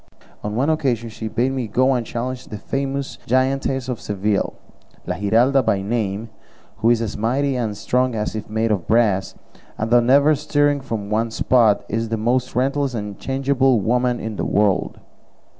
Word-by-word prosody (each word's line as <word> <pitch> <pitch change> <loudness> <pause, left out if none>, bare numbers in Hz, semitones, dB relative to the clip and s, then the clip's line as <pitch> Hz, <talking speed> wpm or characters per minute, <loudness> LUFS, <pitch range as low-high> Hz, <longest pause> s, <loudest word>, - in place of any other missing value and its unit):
On 105 0 -3
one 135 +7 +2
occasion 125 -7 -1
she 110 0 -6
bade 120 +4 0
me 130 -3 -2
go 130 +5 +2
and 125 -2 0
challenge 125 +2 -5
the 105 - -6
famous 135 +4 -3
giantess 130 +1 +1
of 125 -3 -4
Seville, 105 0 -1 0.5
La 90 - -2
Giralda 115 +7 +3
by 100 -5 0
name, 110 0 -2 0.5
who 115 - +2
is 120 -1 +3
as 110 - -4
mighty 130 +5 0
and 110 -5 -2
strong 125 +1 0
as 105 0 -2
if 110 -1 -6
made 110 +1 0
of 95 -5 -1
brass, 105 -4 +2 0.4
and 110 +1 -3
though 120 - +7
never 140 +5 +5
stirring 145 -1 +1
from 110 -6 -5
one 115 +2 +1
spot, 110 -3 +3
is 115 +1 -2
the 115 - -1
most 125 +3 0
restless 135 +1 0
and 105 -3 -5
changeable 135 -2 +1
woman 120 +3 +1
in 110 -2 -5
the - - -2
world. 100 -3 +1
120 Hz, 175 wpm, -21 LUFS, 110-130 Hz, 0.5 s, though